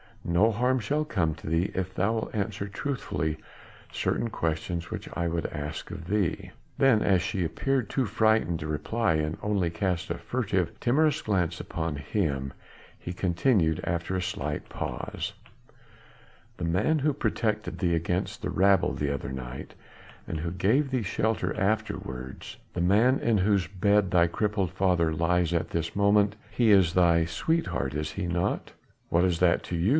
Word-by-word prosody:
No 90 +7 +3
harm 125 +4 +1
shall 145 +8 0
come 85 - 0
to 80 - -11
thee 80 +4 +1
if 95 0 -3
thou 100 +5 +1
wilt 110 -1 -3
answer 100 -1 -2
truthfully 80 - -3 0.5
certain 115 - -1
questions 85 -1 -2
which - - -5
I 85 -1 -1
would 85 0 -2
ask 75 +1 -6
of 90 -5 -7
thee." 100 -3 -1 0.3
Then 135 -6 +4
as 95 -2 +3
she 95 -1 -1
appeared 130 +7 -1
too 135 - 0
frightened 110 -5 +2
to 80 - -5
reply 95 +5 0
and 75 0 -1
only 100 -4 +1
cast 90 +1 -1
a 85 - -2
furtive, 95 -3 -1
timorous 150 +4 +2
glance 90 -5 0
on 80 -3 -2
him, 70 -4 -2 0.5
he 90 - -6
continued 90 - +2
after 85 +2 -2
a 95 - 0
slight 75 -4 -3
pause: - - -4 1.2
"The - - -3
man 105 - +2
who 145 +1 +2
protected 110 -5 -1
thee 85 -3 +2
against 90 +2 -2
the - - -2
rabble 95 +1 +3
the 70 -1 -1
other 70 -2 -4
night, 65 0 -7 0.5
and 80 - -3
who 85 +2 -3
gave 110 +11 +2
thee 130 -3 0
shelter 110 +2 -1
afterwards, 95 - -3 0.2
the 90 - -2
man 110 +9 +4
in 115 -3 +2
whose 95 -2 +2
bed 100 +1 +2
thy 85 -1 +5
crippled 100 0 -1
father 90 -4 +2
lies 85 +1 +1
at 85 - 0
this 85 -1 -2
moment 100 +1 +3
he 115 -3 +3
is 95 -5 +5
thy 85 -2 +4
sweetheart, 85 - -1
is 75 0 -2
he 95 -3 -3
not?" 85 0 -1 0.4
"What 85 +2 +3
is 85 -3 +1
that 90 -1 +3
to 90 - -3
you?" 85 +4 +1
90 Hz, 165 wpm, -27 LUFS, 85-105 Hz, 1.2 s, thy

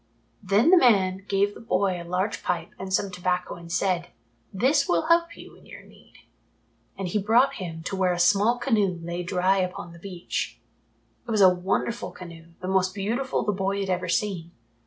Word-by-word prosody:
Then 205 - +3
the 365 -2 +6
old 245 - +8
man 190 -1 -1
gave 200 +1 +1
the - - -12
boy 185 -4 0
a - - -7
large 185 +4 -2
pipe 180 - -2
and 190 0 -6
some 195 0 0
tobacco 180 0 -2
and 170 -1 -11
said, 180 -1 0 0.4
"This 270 +8 +2
will 170 -1 +2
help 335 0 +2
you - - -12
in - - -19
your - - -12
need." - - -20 0.8
And 190 -1 -3
he 210 +4 0
brought 230 +7 +3
him 165 -3 -6
to 195 - -4
where 185 -1 +2
a 175 - -1
small 205 +7 +3
canoe 210 -8 +1
lay 170 +1 -4
dry 185 +2 +1
upon 180 -2 -4
the 170 - -13
beach. 180 -1 -4 0.7
It - - -9
was 215 -2 +2
a 185 -1 +7
wonderful 190 +6 -2
canoe, 170 -2 -11 0.2
the 185 - -5
most 190 0 +1
beautiful 235 +7 -1
the 210 - +1
boy 195 0 -1
had 195 -1 -2
ever 180 0 -2
seen. 180 -4 -1
190 Hz, 200 wpm, -25 LUFS, 180-210 Hz, 0.8 s, old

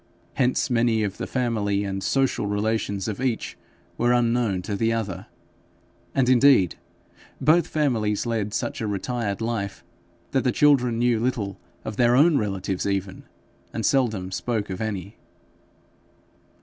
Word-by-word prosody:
Hence 125 +1 +1
many 115 -2 +2
of 100 -2 -3
the - - -3
family 105 -5 0
and 95 -1 -3
social 135 -3 +1
relations 105 -1 -1
of 110 +2 -4
each 125 -4 -2 0.4
were 120 +1 +3
unknown 115 -6 +1
to 100 +1 -3
the 115 +3 +1
other; 100 -5 -3 0.9
and 130 -2 +3
indeed 125 -7 +5 0.7
both 160 +5 +4
families 115 -9 0
led 110 -3 -1
such - - -3
a 110 - -1
retired 105 +1 -2
life 110 -4 -3 0.5
that - - +1
the - - +2
children 130 -6 +3
knew 120 -1 +2
little 110 -5 -2 0.3
of 110 -1 -5
their 120 0 +4
own 150 +2 +5
relatives 95 -2 -2
even, 95 -1 -3 0.5
and - - -2
seldom 110 -9 +1
spoke 105 -1 -2
of 95 - -5
any. 100 -1 -4
110 Hz, 140 wpm, -24 LUFS, 100-125 Hz, 0.9 s, indeed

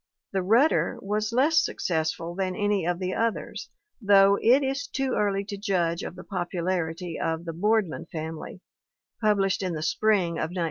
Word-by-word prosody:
The 190 - +1
Rudder 230 - +3
was 210 +2 -2
less 295 +7 +4
successful 165 0 -2
than 185 0 -2
any 205 -4 0
of 175 -1 0
the 185 0 -3
others, 230 0 -2 0.3
though 200 -1 +6
it 260 +5 +5
is 270 +1 -2
too 270 -2 -2
early 200 -1 0
to 200 0 -6
judge 180 -5 0
of - - -6
the 185 - -10
popularity 175 -2 -3
of 165 +1 -2
The 165 - -4
Boardman 190 -2 0
Family, 160 +2 -7 0.6
published 200 -3 +2
in 185 -2 -2
the 155 -1 -4
spring 185 -2 +1
of - - -1
1918. 180 - -8
190 Hz, 170 wpm, -26 LUFS, 170-210 Hz, 0.6 s, though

